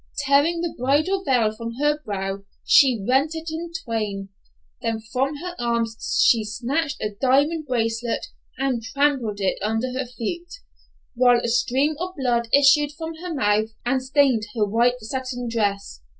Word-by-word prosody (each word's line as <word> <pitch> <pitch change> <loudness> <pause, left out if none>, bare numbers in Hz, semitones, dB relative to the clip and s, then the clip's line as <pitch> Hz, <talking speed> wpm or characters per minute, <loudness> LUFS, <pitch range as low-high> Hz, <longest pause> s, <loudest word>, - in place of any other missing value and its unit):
Tearing 290 +5 +3
the 340 -1 -2
bridal 310 +10 +1
veil 235 - +2
from 230 +1 -6
her 295 +3 +1
brow, 195 -1 -4 0.2
she 245 -8 +5
rent 275 +5 +2
it 320 0 -5
in 335 +1 -5
twain; 210 -4 -3 0.5
then 225 -2 -1
from 255 +6 -2
her 350 +4 -6
arm 235 -1 +1 0.4
she 230 -2 +4
snatched 275 +8 -2
her 210 - -1
diamond 290 +4 +2
bracelet, 230 -1 -1 0.3
and 265 -3 -1
trampled 250 -4 0
it 195 -1 0
under 225 +5 -1
her 260 -1 -3
feet, 340 +9 -5 0.6
while 245 0 +5
a - - -2
stream 260 +5 +1
of 370 +1 -4
blood 240 -3 0
issued 285 +1 +5
from 320 +1 -6
her 355 +2 -6
mouth 215 -6 +1 0.2
and 260 +2 +1
stained 260 -4 +2
her 215 -2 +2
white 240 +4 +2
satin 245 +1 -4
dress. 205 - -2
250 Hz, 155 wpm, -23 LUFS, 225-290 Hz, 0.6 s, she